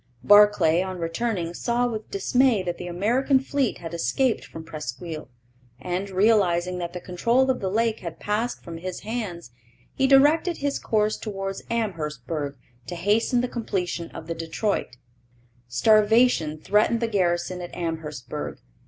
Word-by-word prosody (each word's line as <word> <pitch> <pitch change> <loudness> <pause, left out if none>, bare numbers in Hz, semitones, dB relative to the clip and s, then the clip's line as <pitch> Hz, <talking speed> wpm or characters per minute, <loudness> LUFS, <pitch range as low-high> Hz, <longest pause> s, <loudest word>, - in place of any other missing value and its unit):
Barclay, 205 -5 +6
on 185 0 -4
returning, 170 +1 -2
saw 240 +6 0
with 220 -3 -4
dismay 230 +2 +2
that 175 -1 -4
the 180 - -5
American 235 +10 +2
fleet 270 -1 -1
had 165 -1 -8
escaped 240 +8 0
from 160 - -9
Presqu'isle, 155 +1 -6 0.5
and, 180 +7 -3
realizing 185 -3 +2
that 175 -1 -4
the 180 - -5
control 235 +10 +1
of 255 - -3
the 190 - -2
lake 225 +2 +1
had 170 -2 -7
passed 215 +4 -2
from 170 -2 -7
his 185 +1 -5
hands, 205 - -5 0.4
he 270 - +2
directed 300 +6 +4
his 285 0 -1
course 215 -1 +1
towards 195 -2 -5
Amherstburg 155 - -3 0.3
to 175 - -5
hasten 215 +7 +2
the 250 - -1
completion 185 -8 -3
of - - -9
the 165 - -3
Detroit. 165 - -2 0.7
Starvation 215 - +3
threatened 210 +7 +2
the 230 - 0
garrison 180 -3 0
at 175 - -7
Amherstburg. 150 -5 -5
190 Hz, 145 wpm, -25 LUFS, 170-230 Hz, 0.7 s, Barclay